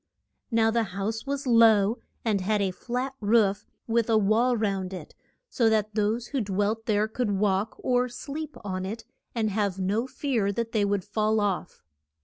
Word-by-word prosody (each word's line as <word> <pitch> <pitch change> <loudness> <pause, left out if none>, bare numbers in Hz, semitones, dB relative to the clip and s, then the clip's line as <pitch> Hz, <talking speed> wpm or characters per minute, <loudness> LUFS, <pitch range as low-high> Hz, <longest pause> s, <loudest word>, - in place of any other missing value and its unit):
Now 225 -2 +3
the 235 +1 +2 0.2
house 220 +5 -3
was 280 0 -2
low 225 -3 +5 0.3
and 210 -4 +1
had 210 +3 +1
a 195 -2 +1
flat 250 +7 -3
roof, 210 -1 +2 0.2
with 230 0 +1
a 225 - +4
wall 225 +4 +3
round 195 -3 -1
it, 185 - -8 0.3
so 235 - +2
that 215 -1 +1
those 220 +3 0
who 275 -3 -1
dwelt 205 +2 -1
there 210 -1 +2
could 225 +1 -2
walk 200 +1 0
or 250 0 +1
sleep 300 +5 -6
on 185 -2 -3
it 220 +4 -5 0.3
and 220 -2 0
have 200 -2 0
no 205 +6 0
fear 255 -7 -1
that 230 +2 -3
they 210 -2 +2
would 200 -2 0
fall 215 +1 +1
off. 195 -3 -2
215 Hz, 175 wpm, -27 LUFS, 200-235 Hz, 0.3 s, low